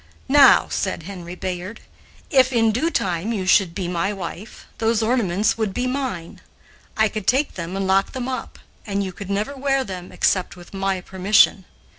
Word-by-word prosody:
"Now," 275 -1 +7
said 185 -4 -2
Henry 180 -1 -8
Bayard, 185 +4 -5 0.5
"if 260 -3 +4
in 225 -3 +3
due 250 +10 0
time 185 - -1
you 200 -5 -2
should 185 -2 +3
be 185 -3 -3
my 180 +3 -1
wife, 195 +1 -8
those 225 0 +1
ornaments 220 -3 +1
would 215 -4 -1
be 250 - -1
mine; 255 -10 -4 0.6
I 220 0 +4
could 210 -2 -6
take 275 +4 +2
them 170 +1 -5
and 195 - -1
lock 195 +1 +2
them 255 -2 -4
up, 260 - -5 0.3
and 200 -1 -1
you 190 - -4
could 200 +1 -9
never 210 +8 -2
wear 270 0 0
them 185 -5 -8
except 185 -2 0
with 175 +1 -14
my 195 -1 -1
permission. 190 +1 +3
200 Hz, 180 wpm, -22 LUFS, 185-235 Hz, 0.6 s, Now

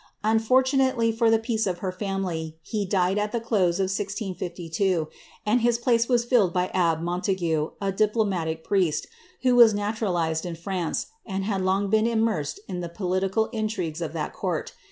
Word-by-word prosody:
Unfortunately 255 +2 +3
for 225 0 +2
the 225 - +5
peace 225 -1 -1
of 180 -2 -1
her 185 +1 -3
family, 185 -5 -3
he 210 -3 -2
died 190 +1 +2
at 210 0 -1
the 235 - -1
close 200 -7 +1
of - - +3
1652, 185 -3 -2 0.4
and 225 +4 +3
his 235 0 +3
place 235 0 +2
was 240 -2 +3
filled 235 -7 +3
by 180 +1 0
abb^ 165 -3 +2
MonUigue, 175 -3 -1
a 195 -1 -1
diplomatic 195 -6 0
priest, 185 -6 +1 0.4
who 250 -1 +4
was 230 -3 +7
naturalized 190 -7 -1
in 175 -2 -4
France, 175 0 -2 0.2
and 195 -2 -3
had 195 -1 -1
long 190 +1 +1
been 220 +1 +4
immersed 220 -11 0
in 180 -2 -4
the 175 -1 -4
political 190 +4 0
intrigues 215 -8 -3
of 160 -3 -3
that 155 -2 -3
court. - - -3
195 Hz, 170 wpm, -25 LUFS, 175-225 Hz, 0.4 s, was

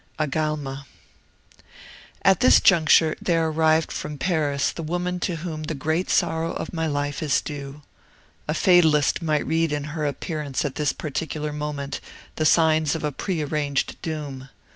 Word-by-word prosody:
VII 155 - +1
AGALMA 145 -2 -3 1.4
"At 195 -3 +5
this 255 - +6
juncture 160 -3 +5
there 165 -2 +1
arrived 160 0 +2
from 150 - -5
Paris 145 -5 0
the - - -7
woman 180 +3 -2
to 175 -1 -1
whom 160 -1 -5
the 155 0 -4
great 160 +6 -1
sorrow 165 -2 +1
of - - -5
my 160 -1 -1
life 145 -1 -2
is 150 -3 +2
due. 145 0 -7 0.6
A 150 - -1
fatalist 160 -4 +4
might 155 -2 0
read 165 0 +1
in 145 -1 -2
her 155 -2 -1
appearance 145 -1 -3
at 140 - -2
this 150 -2 0
particular 150 0 -4
moment 150 -2 -4 0.4
the 155 - +2
signs 160 -1 +3
of 160 - -5
a 150 - 0
prearranged 150 -4 -2
doom. 145 -5 -5
155 Hz, 155 wpm, -24 LUFS, 145-165 Hz, 1.4 s, this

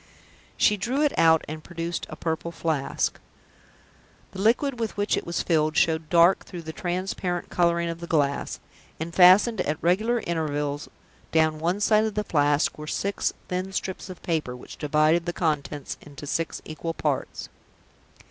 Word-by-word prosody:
She 210 - +4
drew 255 +8 0
it 295 - +2
out, 160 -1 +4
and 155 0 -6
produced 170 +1 -4
a - - -7
Purple 165 +1 -3
Flask. 160 -4 -1 1.1
The 190 - -6
liquid 245 +4 +2
with 225 -3 -3
which 205 0 +1
it - - -4
was 170 - -1
filled 155 -2 +1
showed 160 -1 +2
dark 170 +2 +5
through 175 -2 -8
the 160 0 -7
transparent 180 +1 -3
coloring 170 -1 +2
of 170 0 -4
the 170 - -7
glass; 145 -4 0 0.4
and 165 +1 -5
fastened 190 +4 +6
at 150 -2 -1
regular 215 +8 +2
intervals 150 -3 -2 0.4
down 160 -1 +2
one 175 +5 0
side 215 +1 +4
of 215 -2 -3
the 210 - 0
Flask 145 -4 +1
were 150 - -7
six 200 +5 -1 0.2
thin 185 +1 -3
strips 190 +1 -4
of 185 - -10
paper, 155 -7 -1
which 125 - -11
divided 155 +3 +2
the 175 - -1
contents 150 -4 -2
into 145 0 -10
six 165 +3 -2
equal 165 +1 -5
parts. 145 -3 -2
170 Hz, 165 wpm, -25 LUFS, 155-185 Hz, 1.1 s, fastened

